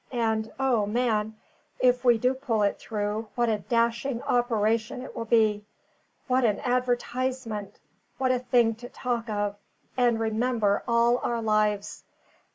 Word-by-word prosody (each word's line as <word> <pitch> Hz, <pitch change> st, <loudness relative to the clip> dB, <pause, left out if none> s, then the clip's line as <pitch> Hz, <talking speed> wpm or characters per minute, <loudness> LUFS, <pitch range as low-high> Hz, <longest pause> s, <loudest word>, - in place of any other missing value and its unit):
And, 220 Hz, -2 st, 0 dB
O, 245 Hz, -6 st, +2 dB
man! 220 Hz, -1 st, 0 dB, 0.4 s
if 250 Hz, 0 st, +3 dB
we 240 Hz, -2 st, +5 dB
do 250 Hz, +3 st, +2 dB
pull 240 Hz, -5 st, -1 dB
it 200 Hz, -, 0 dB
through, 210 Hz, 0 st, -3 dB
what 240 Hz, -1 st, +1 dB
a 215 Hz, -1 st, 0 dB
dashing 235 Hz, +3 st, 0 dB
operation 230 Hz, -1 st, 0 dB
it -, -, -10 dB
will 230 Hz, -2 st, -4 dB
be! 215 Hz, -2 st, +2 dB, 0.6 s
What 255 Hz, 0 st, +2 dB
an 210 Hz, -4 st, +2 dB
advertisement! 245 Hz, -3 st, -2 dB, 0.4 s
what 260 Hz, -1 st, +1 dB
a 255 Hz, -, +1 dB
thing 240 Hz, -2 st, +2 dB
to 245 Hz, +1 st, -10 dB
talk 240 Hz, -2 st, -3 dB
of, 205 Hz, -1 st, -2 dB, 0.4 s
and 240 Hz, -3 st, +2 dB
remember 220 Hz, -2 st, +1 dB
all 235 Hz, +1 st, +3 dB
our 235 Hz, -1 st, -1 dB
lives! 210 Hz, -2 st, 0 dB
230 Hz, 145 wpm, -26 LUFS, 215-245 Hz, 0.6 s, we